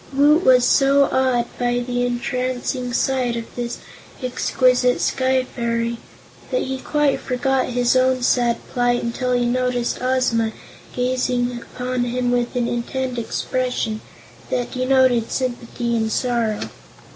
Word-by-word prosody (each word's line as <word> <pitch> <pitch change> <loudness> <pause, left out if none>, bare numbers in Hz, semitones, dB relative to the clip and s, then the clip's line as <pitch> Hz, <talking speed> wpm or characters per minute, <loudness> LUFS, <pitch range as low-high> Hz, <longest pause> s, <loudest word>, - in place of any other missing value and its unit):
Woot 295 +5 +4
was 250 -1 +5
so 275 +1 +4
awed 255 -2 +2
by 245 0 +1
the 245 0 -1
entrancing 250 +1 -2
sight 250 -1 0
of 230 -1 -4
this 240 -1 -4 0.5
exquisite 250 0 +2
Sky 260 0 +1
Fairy 235 -1 -2 0.5
that - - 0
he 265 0 -4
quite 295 0 +1
forgot 260 +1 0
his 245 0 +1
own 255 0 +2
sad 240 -1 +2
plight 245 0 +1
until 250 +1 -1
be 245 - +1
noticed 245 0 0
Ozma 250 -3 +1 0.4
gazing 250 -1 0
upon 250 0 -3
him 245 0 -1
with 245 0 0
an 240 -1 +1
intent 245 +1 -2
expression 245 -2 -2 0.5
that 245 -1 -2
denoted 255 -2 +2
sympathy 240 -2 -2
and 220 -1 0
sorrow. 235 -3 0
250 Hz, 130 wpm, -21 LUFS, 240-255 Hz, 0.5 s, was